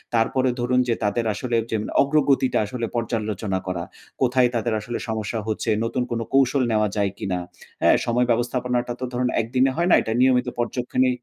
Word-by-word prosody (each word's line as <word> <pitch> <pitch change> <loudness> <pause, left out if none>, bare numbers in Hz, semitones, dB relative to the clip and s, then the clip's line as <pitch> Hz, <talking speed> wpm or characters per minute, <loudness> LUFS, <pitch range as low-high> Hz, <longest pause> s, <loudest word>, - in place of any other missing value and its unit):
তারপরে 130 +3 +2
ধরুন 125 +1 +2
যে 115 - +2
তাদের 115 +3 0
আসলে 120 +3 -2 0.2
যে 110 - +1 0.2
অগ্রগতিটা 140 -2 +2
আসলে 115 +2 -4
পর্যালোচনা 110 -4 -2
করা। 85 -2 -2 0.4
কোথায় 125 -1 +3
তাদের 115 0 0
আসলে 115 +3 -5
সমস্যা 110 +1 -2
হচ্ছে? 110 - -2 0.2
নতুন 125 +2 -1
কোন 115 - -1
কৌশল 135 0 +3
নেওয়া 105 -1 +2
যায় 100 -2 +1
কিনা? 90 -2 -2 0.4
হ্যাঁ? - - +5
সময় 120 +1 +2
ব্যবস্থাপনাটা 120 +1 0
তো - - -5
ধরুন 125 0 0
একদিনে 130 +4 +1
হয় 175 +1 +2
না, - - +7
এটা 110 - -2
নিয়মিত 125 -1 +3
পর্যক্ষণে 125 +2 0
120 Hz, 170 wpm, -23 LUFS, 110-125 Hz, 0.4 s, না